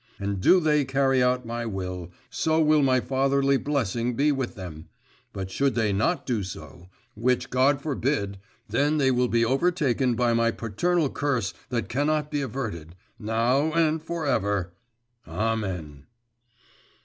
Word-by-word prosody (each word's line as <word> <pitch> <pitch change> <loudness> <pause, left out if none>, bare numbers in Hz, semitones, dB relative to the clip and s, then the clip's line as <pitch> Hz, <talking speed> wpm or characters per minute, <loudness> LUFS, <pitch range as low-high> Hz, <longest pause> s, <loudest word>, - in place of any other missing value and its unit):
And 100 -1 -3
do 185 - +6
they 150 -3 +2
carry 135 -1 +2
out 125 0 +1
my 120 +1 -4
will, 90 -4 -5 0.2
so 160 0 +1
will 155 -1 +4
my 130 -2 +3
fatherly 135 +2 +1
blessing 120 -4 -1
be 145 +4 +3
with 135 -3 -3
them, 85 -5 -9 0.4
but 95 -1 -6
should 140 +6 +1
they 110 -4 +1
not 140 - 0
so 125 - 0
do, 90 - -6 0.2
which 125 +3 0
God 135 +2 +3
forbid, 130 -9 -1 0.3
then 145 +2 +1
will 130 -3 +2
they - - -8
be - - +4
overtaken 135 -3 +1
by 120 0 +2
my 115 0 +3
paternal 140 - 0
curse 130 -9 -1 0.2
that 120 -2 -2
cannot 150 +3 0
be 145 - -1
averted, 105 - -5 0.2
now 120 +8 +1
and 160 -1 +2
for 165 0 -4
ever, 100 -8 0 0.5
amen! 90 -7 -3
125 Hz, 150 wpm, -25 LUFS, 105-145 Hz, 0.5 s, do